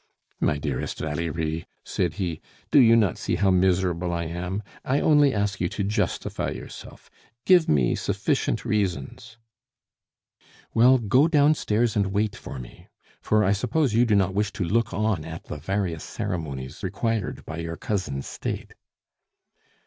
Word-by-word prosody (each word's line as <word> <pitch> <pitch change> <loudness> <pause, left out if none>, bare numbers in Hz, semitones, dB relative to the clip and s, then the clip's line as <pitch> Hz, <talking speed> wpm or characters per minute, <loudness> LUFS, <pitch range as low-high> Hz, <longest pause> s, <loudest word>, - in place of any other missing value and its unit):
"My 75 - +1
dearest 70 -3 -3
Valerie," 80 +1 -3 0.2
said 90 - -1
he, 85 -6 -3 0.3
"do 145 - +7
you 115 -3 +7
not 105 -7 +2
see - - -1
how 100 -2 +3
miserable 90 -1 +2
I 85 0 -1
am? 90 +5 -4 0.2
I 135 +3 +1
only 145 -3 +5
ask 100 -2 -1
you 90 - +1
to 100 - -3
justify 105 +2 -1
yourself. - - -10 0.3
Give 180 -3 +5
me 70 -5 +3
sufficient - - -1
reasons 105 - -2 0.6
" - - -31
"Well, 125 +3 +6
go 125 +6 +3
downstairs 140 -8 +2
and 100 -2 +2
wait 105 +2 0
for - - -8
me; - - -11 0.3
for 110 0 +2
I 95 - +3
suppose 125 +6 +1
you 120 +2 +4
do 105 - +3
not 95 -1 +2
wish 105 +1 0
to 95 - -2
look 110 +6 +1
on 105 -5 0
at 80 +1 -7
the 75 - -7
various 85 0 -2
ceremonies 75 -10 -5
required 105 +2 -2
by 80 +1 -6
your 85 0 -4
cousin's 90 -10 -3
state." - - -5
100 Hz, 155 wpm, -25 LUFS, 85-110 Hz, 0.6 s, do